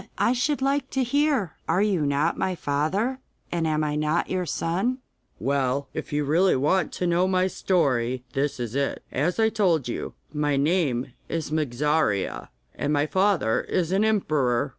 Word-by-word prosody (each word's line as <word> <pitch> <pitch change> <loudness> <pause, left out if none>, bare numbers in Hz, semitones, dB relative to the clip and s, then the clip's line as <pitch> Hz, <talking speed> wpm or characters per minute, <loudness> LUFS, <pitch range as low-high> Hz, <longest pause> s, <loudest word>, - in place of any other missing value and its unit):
I 240 - +3
should 265 +2 0
like 275 0 0
to 265 - +3
hear. 275 - +1 0.2
Are 195 - +3
you 185 -8 +1
not 145 +4 +1
my 185 - -1
father, 180 - -1 0.3
and 170 -2 0
am 155 0 +1
I 150 -1 -1
not 155 +3 0
your 185 -2 -1
son?' 190 +13 -1 0.4
'Well, 140 +2 0
if - - -5
you 145 0 0
really 170 +6 +3
want 150 +6 +1
to 180 - -2
know 175 +1 +2
my 185 -1 +2
story, 130 -10 0
this 140 -1 -1
is 120 -2 -4
it: 140 0 -1
As 165 - 0
I 220 0 +4
told 175 - +1
you, 120 - -4 0.2
my 150 -2 +1
name 140 -5 +1 0.2
is 160 -2 -3
Mogarzea, 150 -6 0 0.2
and 145 - -2
my 145 0 +2
father 185 - +2
is 180 -2 -1
an 195 +2 +2
emperor. 145 - +1
160 Hz, 170 wpm, -25 LUFS, 140-190 Hz, 0.4 s, I